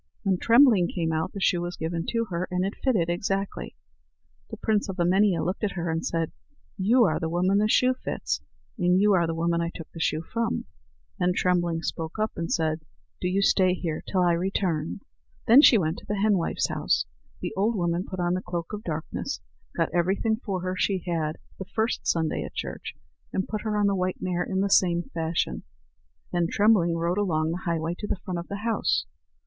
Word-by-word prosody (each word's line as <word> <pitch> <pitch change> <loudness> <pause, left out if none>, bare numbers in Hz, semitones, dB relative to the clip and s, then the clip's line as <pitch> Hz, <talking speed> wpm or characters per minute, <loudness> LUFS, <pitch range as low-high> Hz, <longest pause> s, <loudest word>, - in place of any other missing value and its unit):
When 190 -3 +1
Trembling 230 -7 +6
came 165 -3 -2
out, 160 0 -1
the 200 - -5
shoe 180 -2 +2
was 175 0 -4
given 165 +1 -3
to 230 -1 0
her, 175 +1 -2
and 180 0 0
it 200 - -2
fitted 215 -11 +2
exactly. 195 +3 -2 0.7
The - - -7
prince 215 -2 0
of 190 - -4
Emania 180 0 +3
looked 185 +5 -2
at 205 - 0
her 170 -2 -2
and 165 +1 -2
said: 165 -1 -1 0.4
"You 230 +6 +4
are 160 -6 +2
the 165 -1 -2
woman 185 +4 +2
the 210 - +3
shoe 255 +4 +4
fits, - - -3 0.4
and 180 0 +3
you 205 +1 +4
are 170 -3 +3
the 165 - -2
woman 170 +1 +1
I 170 - -1
took 165 - -10
the 165 - -9
shoe 155 0 0
from." 230 +5 -2 0.5
Then 180 0 +2
Trembling 175 -3 +1
spoke 160 +3 -4
up, 215 +1 0
and 165 0 -3
said: 160 -1 0 0.4
"Do - - 0
you 195 +2 +1
stay 185 -2 +4
here 165 -4 -3
till 185 - +1
I 175 - +4
return." 170 -1 -1 0.4
Then 245 +5 +8
she 250 - +7
went 160 -3 -1
to - - -17
the 205 - -1
henwife's 195 -4 +1
house. - - +1 0.4
The - - -3
old 215 +4 +1
woman 175 -1 0
put 185 -1 -7
on 175 0 +1
the 185 - -1
cloak 175 +1 -5
of 210 0 -5
darkness, 155 -2 -4 0.4
got - - 0
everything 195 +6 +1
for 195 -6 -3
her 185 +1 -2
she 185 0 0
had 160 -3 -1 0.2
the 190 - -5
first 220 +5 -1
Sunday 160 -2 +1
at - - -9
church, - - -5 0.4
and 190 - -1
put 215 -1 -3
her 215 -2 -1
on 205 - +3
the 200 - +3
white 185 -1 -1
mare 180 -1 -1
in 190 +1 -1
the 200 - +2
same 175 -3 +3
fashion. 165 0 -1 0.7
Then 175 -1 +2
Trembling 200 -5 +3
rode 170 +4 0
along 160 -5 +1
the 180 +3 -5
highway 165 -1 -1
to 210 - -4
the - - -1
front 180 -3 -2
of 170 - -7
the 200 +2 -6
house. 230 -1 +1
180 Hz, 210 wpm, -26 LUFS, 170-200 Hz, 0.7 s, Then